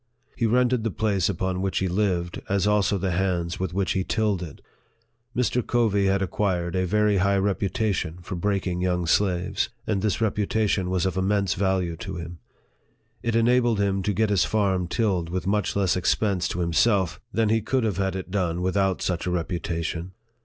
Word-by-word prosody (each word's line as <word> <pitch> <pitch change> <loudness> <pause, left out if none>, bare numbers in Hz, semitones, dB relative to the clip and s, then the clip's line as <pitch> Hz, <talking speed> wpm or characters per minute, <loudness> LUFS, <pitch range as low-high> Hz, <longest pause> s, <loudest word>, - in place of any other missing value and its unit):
He 115 - +1
rented 125 0 +2
the 115 - 0
place 100 -4 0
upon 95 -1 -2
which 95 -1 -1
he 95 - +1
lived, 90 -2 -1
as 100 -1 +1
also 105 -1 +2
the 95 0 -1
hands 85 -1 -1
with 95 -2 -2
which 95 +1 0
he 95 - 0
tilled 105 -3 0
it. 80 -5 -8 0.8
Mr. 125 0 +1
Covey 105 -5 +2
had 95 0 +2
acquired 90 -3 -1
a 95 0 +1
very 105 +1 +2
high 100 +1 +2
reputation 100 -3 -1
for 95 - -6
breaking 90 -1 -1
young 90 -1 0
slaves, 90 +1 +1 0.2
and 100 -3 0
this 105 -3 0
reputation 105 -3 0
was 90 0 0
of 95 0 -1
immense 100 0 +1
value 95 -3 0
to - - -6
him. 85 0 -7 0.8
It 115 -1 -1
enabled 120 0 +3
him 100 -1 +1
to 105 - 0
get 105 +2 +1
his 100 -3 +3
farm 95 -4 +1
tilled 90 -4 0
with 90 +1 -3
much 105 +2 0
less 95 -4 +2
expense 95 0 +1
to 90 - -3
himself 90 +2 +2
than 115 -2 +1
he 110 +1 +2
could 130 +4 0
have 105 -5 -1
had 95 -1 -1
it 95 -1 -6
done 90 -3 -1
without 95 0 +1
such 90 -1 -1
a - - +1
reputation. 85 0 -3
95 Hz, 185 wpm, -25 LUFS, 90-105 Hz, 0.8 s, enabled